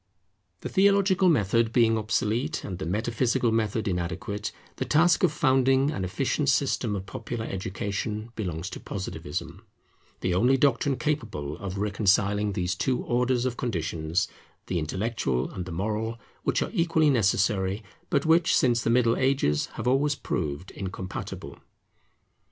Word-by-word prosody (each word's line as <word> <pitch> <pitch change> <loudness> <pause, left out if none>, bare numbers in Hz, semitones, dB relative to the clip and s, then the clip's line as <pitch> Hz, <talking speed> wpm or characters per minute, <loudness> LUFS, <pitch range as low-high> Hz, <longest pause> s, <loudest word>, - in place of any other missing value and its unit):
The - - -4
theological 195 -1 +4
method 115 - +2
being 115 -2 +4
obsolete, 110 +7 -1
and 95 -2 -5
the 95 - -4
metaphysical 115 +5 +1
method 110 -1 0
inadequate, 95 +4 -3 0.3
the - - -1
task 160 +2 +4
of 180 - +4
founding 135 -1 +3
an 95 - -3
efficient 135 - 0
system 130 -5 +1
of 95 -1 -5
popular 110 +3 -5
education 100 +4 -4
belongs 90 -3 -4
to - - -6
Positivism; 95 -2 -5 0.6
the 90 - 0
only 125 +9 +4
doctrine 135 0 +2
capable 105 - -2
of 100 -1 -5
reconciling 100 0 +2
these 90 -1 -1
two 125 +6 -1
orders 125 0 +1
of 125 -1 -2
conditions, 85 -5 -1 0.4
the 90 - -1
intellectual 80 - -1
and 90 - -5
the 90 - -7
moral, 110 +6 -2 0.2
which - - +1
are - - -6
equally 165 -5 +3
necessary, 100 -3 +1 0.3
but 140 0 +1
which 160 +1 +4
since 120 -2 +3
the 115 - 0
Middle 115 -1 +3
Ages 130 - +1
have - - -4
always 140 +3 +2
proved 75 - -3
incompatible. 95 -1 -6
110 Hz, 140 wpm, -27 LUFS, 95-130 Hz, 0.6 s, theological